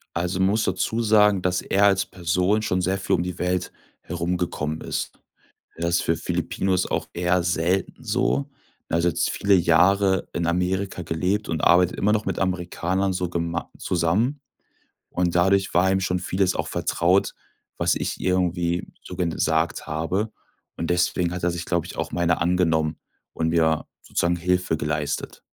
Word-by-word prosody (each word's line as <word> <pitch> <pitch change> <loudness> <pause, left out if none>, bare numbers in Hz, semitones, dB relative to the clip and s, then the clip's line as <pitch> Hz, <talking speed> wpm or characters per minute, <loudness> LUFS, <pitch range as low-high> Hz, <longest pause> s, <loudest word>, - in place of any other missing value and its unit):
Also, 90 +2 -1
man 95 +1 +3
muss 110 +2 +1
dazu 95 +5 -1
sagen, 105 -3 +4
dass 90 0 0
er 100 +1 +2
als 95 -1 +3
Person 90 +4 0
schon 90 -3 0
sehr 95 +2 0
viel 95 - +1
um 85 - 0
die 90 -1 -5
Welt 90 0 -1 0.3
herumgekommen 85 -3 -3
ist. - - -4 0.6
Das 85 +1 0
ist - - +2
für 85 - +1
Filipinos 95 +3 -1
auch - - -2
eher 90 +1 +1
selten 90 +7 -1
so. 125 +5 0 0.4
Er 85 - +1
hat 85 - 0
jetzt 85 0 +1
viele 100 0 +2
Jahre 95 +3 +3
in 85 - -1
Amerika 90 +2 -1
gelebt 90 +6 -1
und 80 -2 -1
arbeitet 90 +1 +4
immer 105 +2 +2
noch 105 -1 0
mit 95 -3 -2
Amerikanern 95 +1 -1
so 90 -1 -2
gemei 85 0 -2
zusammen 95 - 0 0.7
und 90 -1 -1
dadurch 95 +2 +3
war 95 +2 +3
ihm 95 0 +2
schon 90 -1 0
vieles 95 +1 0
auch - - -2
vertraut, 90 +3 +1 0.5
was - - +2
ich - - -3
irgendwie 90 -2 0 0.2
so 90 - -9
gesagt 80 -2 0
habe 85 +8 -1 0.5
und 85 - -3
deswegen 90 0 +1
hat 90 - -5
er 90 - +2
sich, 85 0 -4
glaube 85 -2 -1
ich, - - -9
auch - - -3
meiner 85 -1 +1
angenommen 80 -3 +1 0.4
und 80 - -1
mir 80 -1 +2 0.2
sozusagen 85 0 0
Hilfe 90 -1 0
geleistet. 75 -1 -3
90 Hz, 165 wpm, -24 LUFS, 85-95 Hz, 0.7 s, sagen